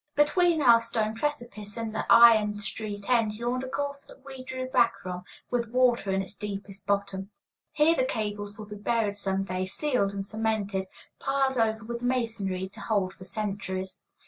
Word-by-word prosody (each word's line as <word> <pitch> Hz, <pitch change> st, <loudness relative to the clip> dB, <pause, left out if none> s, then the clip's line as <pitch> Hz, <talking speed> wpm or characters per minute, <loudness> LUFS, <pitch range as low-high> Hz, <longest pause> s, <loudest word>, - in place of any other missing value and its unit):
Between 320 Hz, +2 st, +3 dB
our 235 Hz, -2 st, +7 dB
stone 220 Hz, -2 st, -1 dB
precipice 225 Hz, -6 st, -3 dB
and 225 Hz, -1 st, -3 dB
the 220 Hz, -, -2 dB
iron 220 Hz, -3 st, +7 dB
street 205 Hz, 0 st, -5 dB
end 230 Hz, -4 st, +2 dB
yawned 240 Hz, +3 st, -2 dB
a -, -, -4 dB
gulf 280 Hz, +1 st, -4 dB
that 270 Hz, -, -16 dB
we 265 Hz, -2 st, -8 dB
drew 255 Hz, 0 st, -4 dB
back 240 Hz, -2 st, +3 dB
from, 180 Hz, -1 st, -6 dB, 0.3 s
with 235 Hz, -2 st, 0 dB
water 245 Hz, -3 st, +3 dB
in 195 Hz, 0 st, +1 dB
its 190 Hz, -, -9 dB
deepest 200 Hz, -1 st, -7 dB
bottom. 200 Hz, -1 st, -1 dB, 0.4 s
Here 310 Hz, +2 st, +5 dB
the 285 Hz, -, +1 dB
cables 205 Hz, -3 st, -3 dB
would 215 Hz, -1 st, -9 dB
be 210 Hz, -, -7 dB
buried 215 Hz, -1 st, 0 dB
some 195 Hz, -1 st, -1 dB
day, 185 Hz, 0 st, -2 dB
sealed 250 Hz, -3 st, 0 dB
and 200 Hz, -1 st, -4 dB
cemented, 210 Hz, -3 st, -1 dB, 0.3 s
piled 270 Hz, -2 st, +1 dB
over 220 Hz, 0 st, +1 dB
with 235 Hz, +1 st, -5 dB
masonry, 225 Hz, -7 st, -1 dB
to 210 Hz, -, -14 dB
hold 200 Hz, -3 st, 0 dB
for 185 Hz, -, -12 dB
centuries. 190 Hz, -1 st, -3 dB
220 Hz, 175 wpm, -28 LUFS, 200-245 Hz, 0.4 s, our